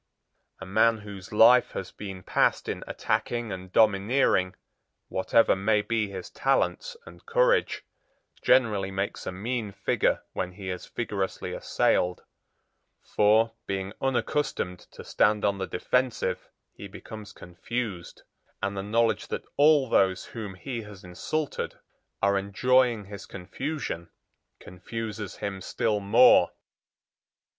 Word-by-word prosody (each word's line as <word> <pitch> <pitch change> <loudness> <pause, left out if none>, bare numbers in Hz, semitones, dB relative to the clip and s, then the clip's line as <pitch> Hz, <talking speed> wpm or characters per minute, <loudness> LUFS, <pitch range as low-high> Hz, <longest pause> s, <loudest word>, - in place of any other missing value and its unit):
A 95 - -7
man 110 +4 +3
whose 100 -3 -10
life 115 +4 +6
has 95 - -5
been 95 -3 -8
passed - - +1
in - - -4
attacking 120 -2 -2
and 95 -1 -7
domineering, 100 -2 +3 0.5
whatever 95 +4 +3
may 105 +2 +1
be 110 -2 -1
his 95 -2 -7
talents 470 - 0
and - - -14
courage, - - +2 0.6
generally 105 -7 +3
makes 95 +1 -4
a - - -1
mean 110 +3 -3
figure - - 0
when 90 0 -3
he 95 -1 -6
is 90 - -6
vigorously 100 -5 -3
assailed, 90 0 +1 0.8
for, 110 +2 +3
being 95 0 -3
unaccustomed 135 -7 -1
to - - -11
stand 105 0 +2
on 100 -1 +1
the 95 - -2
defensive, 125 +7 -1 0.2
he 100 - -9
becomes 105 +1 -10
confused; 90 +1 -6 0.4
and 100 - -2
the 95 - -2
knowledge 115 +3 +1
that - - -5
all 145 -2 +5
those 95 -4 +2
whom 105 -5 -7
he 115 +6 -5
has 105 -3 -12
insulted 135 - -3 0.5
are 100 0 +3
enjoying 120 +2 +2
his 100 0 -9
confusion 95 - -5 0.5
confuses 105 +2 -6
him 95 -2 -5
still 105 +2 -1
more. 100 0 +6
105 Hz, 125 wpm, -27 LUFS, 95-115 Hz, 0.8 s, life